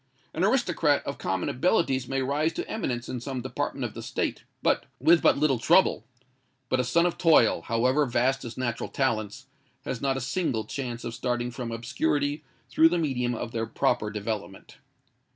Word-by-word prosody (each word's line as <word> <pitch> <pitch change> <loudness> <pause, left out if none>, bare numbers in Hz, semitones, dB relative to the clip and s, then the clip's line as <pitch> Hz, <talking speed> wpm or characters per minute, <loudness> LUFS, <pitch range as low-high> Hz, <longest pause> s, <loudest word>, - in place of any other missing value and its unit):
An 165 - -1
aristocrat 195 - +2
of 140 - -5
common 95 -1 -1
abilities 135 - +1
may 135 0 -1
rise 150 +5 0
to - - -4
eminence 125 - -3
in 125 - -4
some 130 +1 -4
department 130 - -3
of - - -5
the - - -7
State, - - -3 0.5
with 165 +5 +5
but - - +4
little 140 -4 +2
trouble: 175 +10 +4 0.7
but 130 - +1
a - - +2
son 170 +7 +2
of 175 - -1
toil, 155 - +5
however 130 - +1
vast 130 +3 +1
his 120 -2 -8
natural 120 -3 -2
talents, 120 -2 -1 0.4
has 120 - -4
not 135 -1 0
a - - -3
single 135 -4 -1
chance 120 -1 -5
of 115 - -5
starting 120 0 -2
from 120 -1 -5
obscurity 145 +5 -1 0.2
through 160 +5 +5
the 175 - 0
medium 125 -6 0
of 115 - -5
their 115 -1 -2
proper 105 -1 0
development. 105 -2 -5
130 Hz, 175 wpm, -27 LUFS, 120-150 Hz, 0.7 s, with